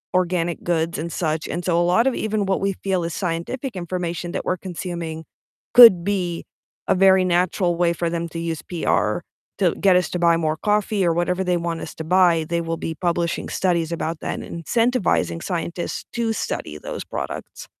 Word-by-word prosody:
organic 175 -2 0
goods 165 -1 0
and 165 +2 -4
such, 155 -2 -1
and 175 - -4
so 170 -1 +2
a - - +3
lot 225 +9 +3
of 265 - +1
even 215 -2 -1
what 190 - +1
we 195 0 0
feel 190 -3 0
is 165 - -3
scientific 195 - -3
information 175 -1 -3
that - - -3
we're 185 - -1
consuming 170 -3 -5 0.5
could 225 -8 +10
be 180 -4 -1 0.4
a - - +3
very 190 0 +5
natural 180 0 +1
way 170 0 +2
for 170 0 -2
them 170 0 -2
to 165 - -7
use 165 -2 -3
PR 175 -2 0 0.4
to - - +2
get 195 -2 +4
us 180 0 +2
to 180 - -3
buy 170 -1 +4
more 155 -1 -1
coffee 210 0 +1
or 170 - +3
whatever 180 +2 0
they 180 -1 +1
want 170 -1 -3
us - - -7
to 160 - -6
buy, 170 -1 +3
they 170 - 0
will 165 0 -2
be 165 - -4
publishing 170 0 -1
studies 170 -3 0
about 165 -1 -3
that - - -3
and 170 -1 -8
incentivizing 230 - +1
scientists 170 -1 -4
to 230 -1 0
study - - -4
those - - -6
products. - - -6
175 Hz, 195 wpm, -22 LUFS, 170-190 Hz, 0.5 s, could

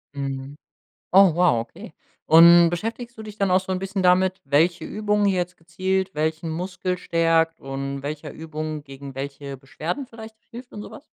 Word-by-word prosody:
Mhm. 135 0 -5 0.6
Oh 190 -3 +7
wow, 175 -9 +3
okay. 115 0 -9 0.3
Und 170 +1 +8
beschäftigst 230 +7 -5
du 220 - -8
dich 210 -1 -10
dann 195 -3 +1
auch 185 - +5
so 190 0 -4
'n 185 - -2
bisschen 195 0 -3
damit, 185 +1 +3
welche 160 +6 +2
Übung 210 0 0
jetzt 180 -2 0
gezielt 190 +3 -2
welchen 160 +2 -1
Muskel 180 +2 -3
stärkt 165 -2 +1
und 135 0 -5
welcher 145 +2 -6
Übung 155 -1 -6
gegen 135 -1 -10
welche 140 0 -6
Beschwerden 155 - -5
vielleicht 220 -1 -11
hilft 245 +2 -11
und 210 - -8
so - - -9
was? - - -12
170 Hz, 170 wpm, -23 LUFS, 150-190 Hz, 0.6 s, Und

